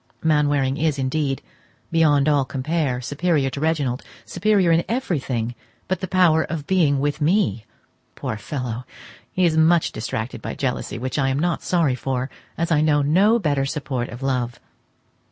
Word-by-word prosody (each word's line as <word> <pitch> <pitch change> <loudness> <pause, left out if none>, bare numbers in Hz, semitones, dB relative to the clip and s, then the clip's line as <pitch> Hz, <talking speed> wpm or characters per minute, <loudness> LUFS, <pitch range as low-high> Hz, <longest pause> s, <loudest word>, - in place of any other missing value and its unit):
Mainwaring 145 -3 +2
is 155 -3 +1
indeed, 135 +1 -1 0.5
beyond 150 -4 +4
all 145 -2 +3
compare, 135 -1 -1
superior 145 0 0
to 140 - -5
Reginald—superior 165 - 0
in 165 +1 +3
everything 135 - -1 0.3
but 185 - -1
the 185 - -4
power 175 -4 +4
of 155 -3 -5
being 155 -6 +2
with 145 +2 -1
me! 150 - +1 0.5
Poor - - -4
fellow! 125 +1 -4 0.5
he 185 - +2
is 165 -2 +2
much 160 +1 +4
distracted 110 +2 -4
by - - -5
jealousy, 130 -1 -2
which 130 +4 -3
I 135 -1 +2
am 135 - 0
not 170 +2 0
sorry 165 -7 +1
for, 130 +1 -3 0.3
as 170 +1 -1
I 150 -2 +4
know 150 -2 +3
no 195 +10 +4
better 145 -9 0
support 135 -5 -3
of 120 +4 -8
love. 125 -3 -1
145 Hz, 155 wpm, -22 LUFS, 130-165 Hz, 0.5 s, beyond